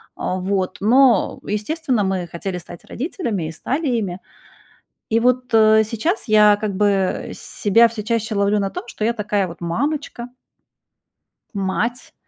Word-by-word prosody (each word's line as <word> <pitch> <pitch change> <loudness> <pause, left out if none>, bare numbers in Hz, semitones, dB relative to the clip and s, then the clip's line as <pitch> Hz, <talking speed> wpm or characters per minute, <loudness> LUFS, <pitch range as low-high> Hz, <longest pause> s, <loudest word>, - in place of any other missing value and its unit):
А 185 - -2
вот, 185 -1 -1
но, 240 0 +4
естественно, 245 +3 -1
мы 190 -2 -1
хотели 180 +2 -5
стать 175 0 -12
родителями 235 - -3
и - - -6
стали 275 - -3
ими. 205 -8 -1 0.9
И 225 - +3
вот, 250 0 +1
э, 220 0 +6
сейчас 250 - -2
я 210 -1 +6
как 205 -2 -3
бы 195 -2 0
себя 225 +3 +3
всё 225 -1 -6
чаще 225 0 -1
ловлю 200 +1 +2
на 195 -1 -1
том, - - -6
что 220 - -6
я 235 - +2
такая 210 -3 -1
вот 170 0 -11
мамочка. 245 - -3 1.3
Мать. 205 +6 -2
210 Hz, 145 wpm, -20 LUFS, 195-235 Hz, 1.3 s, э